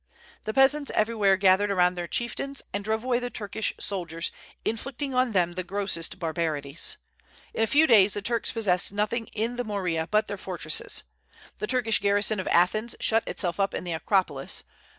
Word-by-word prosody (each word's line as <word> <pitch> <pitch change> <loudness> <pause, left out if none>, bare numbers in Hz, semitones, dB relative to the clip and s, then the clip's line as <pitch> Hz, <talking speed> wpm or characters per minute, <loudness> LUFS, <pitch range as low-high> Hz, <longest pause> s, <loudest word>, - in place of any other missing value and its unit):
The 215 - -2
peasants 280 +2 +4
everywhere 215 -3 +3
gathered 195 +1 +4
around 180 -2 +3
their 175 -1 -5
chieftains, 275 +6 -2
and 200 - -2
drove 220 +2 -1
away 250 -1 +1
the 245 0 -3
Turkish 220 -2 -2
soldiers, 170 -4 -3 0.3
inflicting 270 +4 -3
on 255 -1 +2
them 180 -4 +2
the 185 +1 -4
grossest 190 -3 -1
barbarities. 160 -3 -2 0.6
In - - -2
a 225 - +3
few 295 +7 +5
days 210 -7 +5
the 205 - -2
Turks 235 0 0
possessed 190 -6 0
nothing 215 +3 -1
in 230 +3 -3
the 245 - -1
Morea 180 -7 -2
but 215 0 +2
their 205 - -4
fortresses. 175 -5 -2 0.6
The 210 - -2
Turkish 235 -3 +1
garrison 205 +1 +1
of 185 - -3
Athens 215 +7 +2
shut 225 0 +2
itself 175 -1 -2
up 195 0 +1
in - - -3
the 175 -2 -3
Acropolis. 160 -4 0
205 Hz, 175 wpm, -27 LUFS, 180-230 Hz, 0.6 s, few